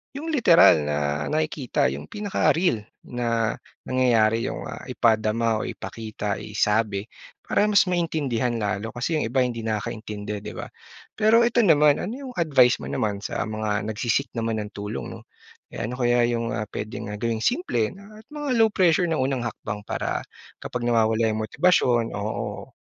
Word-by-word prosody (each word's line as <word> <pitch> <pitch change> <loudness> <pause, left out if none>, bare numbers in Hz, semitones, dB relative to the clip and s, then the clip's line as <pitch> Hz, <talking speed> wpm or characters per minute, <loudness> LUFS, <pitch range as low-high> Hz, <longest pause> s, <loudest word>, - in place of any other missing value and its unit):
yung 315 +4 -4
literal 180 - +6
na 75 0 -1
nakikita 150 -2 0
yung - - -7
pinaka-real, 180 - 0 0.2
na 115 -2 -1 0.2
nangyayari 115 -3 +2
yung, - - -5
ah, - - -7
ipadama 110 0 +1
o - - -3
ipakita 110 -2 -5
isabi, 105 -1 0 0.4
para 210 - +2
mas 205 -1 +5
maintindihan 150 -10 -1
lalo 110 0 -3
kasi 155 +7 -1
yung 115 - -1
iba 130 +3 +2
hindi 120 -2 -2
nakakaintindi, 105 -1 -4
'di - - -8
ba? - - -7 0.5
Pero 220 +2 +5
eto 235 0 +2
naman, 150 -8 +5
ano 215 +6 -4
yung 270 -1 -8
advice 135 -7 +4
mo - - -7
naman 105 -2 -1
sa 100 - -3
mga 110 -1 -2
nagse-seek 120 +4 -1
naman 115 -1 -1
ng 105 - -9
tulong 105 +1 -5
'no? - - -20 0.4
Eh, - - -6
ano 125 +3 -4
kaya 120 -1 +3
yung, 115 0 -2
ah, 105 - -2
pwedeng 110 0 -5
gawing 115 0 -1
simple 245 - 0
at 215 +2 -14
mga 295 -1 -4
low 225 -1 +4
pressure 175 -2 +3
na 160 - 0
unang 130 -1 0
hakbang 105 -3 -5
para - - -3 0.4
kapag 120 -1 -3
nawawala 110 -1 +3
yung 110 0 -1
motibasyon? 120 -5 +2
Oo. 105 +1 -4
115 Hz, 160 wpm, -24 LUFS, 110-160 Hz, 0.5 s, literal